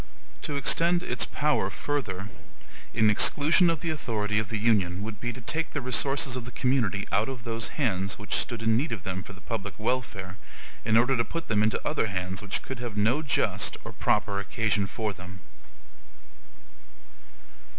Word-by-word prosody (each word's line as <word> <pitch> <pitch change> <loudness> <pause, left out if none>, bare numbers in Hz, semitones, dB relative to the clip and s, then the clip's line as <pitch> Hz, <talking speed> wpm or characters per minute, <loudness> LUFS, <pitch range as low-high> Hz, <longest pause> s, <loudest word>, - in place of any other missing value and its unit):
To 145 - -3
extend 170 +5 +3
its 125 - +1
power 150 0 +1
further, 105 -9 -3 0.6
in 110 -2 +4
EXCLUSION 150 - +5
of 165 -2 -1
the 165 -2 -1
authority 105 -8 -1
of 110 - -3
the 115 - -1
Union, 100 -4 +2
would 105 -2 -6
be 120 - -2
to 125 - -9
take 160 +7 -1
the 145 - -1
resources 135 0 +1
of 125 - -4
the 120 - -7
community 120 -7 +1
out 105 +5 +2
of 130 -3 -6
those 115 -1 -2
hands 95 -9 0
which 105 - -6
stood 115 -2 0
in 115 0 +3
need 135 +6 0
of 105 -6 -4
them 95 0 -3
for 95 - -10
the 95 - -14
public 100 -4 -4
welfare, 105 -5 -2 0.5
in 110 0 +3
order 125 +3 +4
to 115 - +2
put 165 +9 -5
them 105 -2 +3
into 110 0 +2
other 150 -7 +1
hands 95 -1 -3
which 105 -1 -2
could 130 -2 -6
have 120 -4 -5
no 115 +8 +3
just 150 -3 0
or - - -7
proper 105 -1 +1
occasion 105 0 0
for 110 0 -3
them. 90 -1 -10
115 Hz, 180 wpm, -27 LUFS, 100-130 Hz, 0.6 s, EXCLUSION